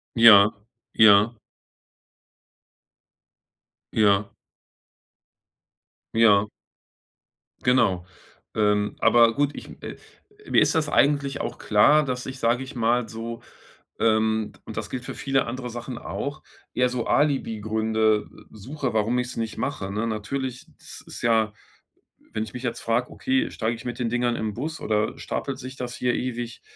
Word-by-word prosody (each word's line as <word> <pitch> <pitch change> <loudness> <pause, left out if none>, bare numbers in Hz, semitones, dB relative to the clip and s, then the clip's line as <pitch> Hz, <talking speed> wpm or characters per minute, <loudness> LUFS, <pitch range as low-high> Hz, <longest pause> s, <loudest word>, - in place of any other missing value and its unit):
Ja, 110 -3 +8 0.4
ja. 110 +1 +6 2.6
Ja. 100 -1 +3 1.9
Ja. 105 -2 +5 1.1
Genau. 95 -8 +2 0.5
Ähm, 105 -1 +1
aber 115 -1 +5
gut 145 0 +1
ich, - - -9
äh - - -7 0.5
mir - - +4
ist - - +3
das 160 -3 +1
eigentlich 140 -1 +2
auch - - -5
klar, 145 +9 +4
dass 125 -2 -3
ich 130 0 -7
sage 120 +2 +1
ich 130 - -10
mal 120 0 +1
so, 115 +1 -6 0.6
ähm 110 -1 +1
und - - -8
das - - -4
gilt 125 -1 -5
für - - -6
viele 135 -1 0
andere 125 +1 -5
Sachen 120 +1 -6
auch 145 +4 -5 0.3
eher 125 0 +2
so 125 -2 -3
Alibi-Gründe 110 -5 +1 0.2
suche, 130 +5 -5
warum 110 +3 +1
ich's 125 0 -3
nicht 115 -1 -3
mache, 100 -9 -3
ne? 105 +3 -2
Natürlich 125 +4 -4
es - - -11
ist - - -9
ja, 110 -2 +2 0.8
wenn 110 - -1
ich 110 - -9
mich 125 - -6
jetzt 120 -2 -3
frage: 120 +2 -1
„Okay, 265 +3 0
steige 115 +1 -2
ich 115 - -12
mit 120 0 -5
den 120 -2 -1
Dingern 120 0 0
in' 110 -2 -3
Bus 155 +6 -4
oder 105 0 0
stapelt 135 -2 -4
sich 130 0 -8
das 125 -2 -5
hier 125 -1 0
ewig?“ 120 -2 -4
115 Hz, 140 wpm, -24 LUFS, 110-130 Hz, 2.6 s, Ja